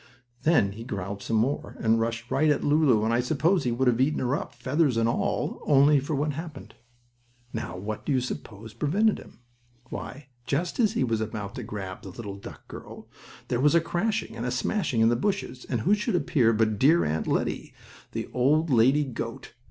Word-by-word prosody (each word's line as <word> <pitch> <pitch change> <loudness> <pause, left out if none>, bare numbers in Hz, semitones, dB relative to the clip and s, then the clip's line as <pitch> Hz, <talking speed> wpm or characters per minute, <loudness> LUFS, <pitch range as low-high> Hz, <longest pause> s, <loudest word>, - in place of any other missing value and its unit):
Then 150 -12 +3
he 110 +3 -8
growled 100 -3 -5
some 115 - -2
more, 125 +6 -1
and 115 0 +3
rushed 115 +1 -3
right 155 +3 +3
at 145 - +2
Lulu, 145 -8 +3
and 115 - +1
I 120 - +3
suppose 160 +8 +2
he 120 - +1
would 130 +2 +1
have 125 0 +3
eaten 150 +3 +2
her 130 +2 0
up, 130 - -5
feathers 130 +1 +1
and 115 0 +2
all, 115 - -1
only 145 0 +6
for 145 +3 -3
what 150 +2 0
happened. 160 +1 -8 0.8
Now, 90 +1 -4
what 105 +3 -5
do - - -2
you 130 - +3
suppose 110 -3 -6
prevented 195 - +1
him? - - -15 0.5
Why, 140 +1 -7 0.2
just 170 - -1
as 220 -4 +3
he - - +1
was 115 -3 0
about 105 -2 -4
to - - -6
grab 95 -3 -6
the 95 - -9
little 100 +1 -7
duck 100 - -11
girl - - -10 0.4
there 120 - 0
was 150 +3 +4
a - - +7
crashing 195 - -2
and 115 - -5
a 125 - -1
smashing 130 - 0
in 115 - +5
the 120 - +2
bushes 190 - -2
and 120 -4 0
who 195 - +3
should 210 -3 0
appear 140 -7 +3
but 110 -2 +1
dear 160 +6 +5
Aunt 75 +1 -1
Lettie, - - -1 0.4
the - - -3
old 150 +5 +2
lady 130 +5 +4
goat! 130 -5 -6
125 Hz, 205 wpm, -27 LUFS, 115-150 Hz, 0.8 s, a